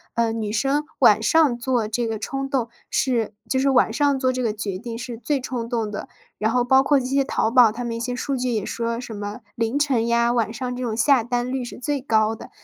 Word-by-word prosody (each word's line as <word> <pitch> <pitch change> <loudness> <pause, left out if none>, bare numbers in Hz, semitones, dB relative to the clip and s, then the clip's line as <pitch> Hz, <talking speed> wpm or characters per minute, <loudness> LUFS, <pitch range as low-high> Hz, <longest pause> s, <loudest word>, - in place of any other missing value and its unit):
呃， 230 -1 +1
女 215 -2 -3
生 275 +7 +1 0.2
晚 220 -4 +5
上 295 -3 +4
做 240 -3 0
这 235 +2 -1
个 225 -2 -3
冲 270 +4 -3
动 255 -4 0 0.2
是 230 -5 0 0.2
就 260 - +1
是 275 +1 +2
晚 250 -4 +3
上 280 +3 +1
做 255 -1 +1
这 255 - -2
个 225 -3 0
决 205 -3 -4
定 230 +2 -6
是 245 -1 -6
最 280 +4 -1
冲 250 -2 -4
动 230 -3 -1
的。 205 - -6 0.3
然 215 +1 0
后 245 +1 +2
包 265 +2 +4
括 285 -1 +3
这 250 - -5
些 275 +2 +1
淘 225 - 0
宝， 235 -3 +6
它 245 +2 -5
们 230 -1 -3
一 - - -4
些 245 +1 -2
数 275 +2 -2
据 250 0 -1
也 220 -3 -1
说 230 0 -3
什 235 -3 -7
么 205 +2 -5 0.2
凌 230 +4 0
晨 265 -6 +2
呀， 235 0 +2
晚 225 -2 0
上 250 +1 -4
这 250 - -4
种 225 -2 -2
下 260 -1 +4
单 245 +1 -2
率 265 -1 -2
是 240 - -8
最 285 +2 -2
高 220 -3 +2
的。 - - -11
240 Hz, 270 characters per minute, -23 LUFS, 225-260 Hz, 0.3 s, 宝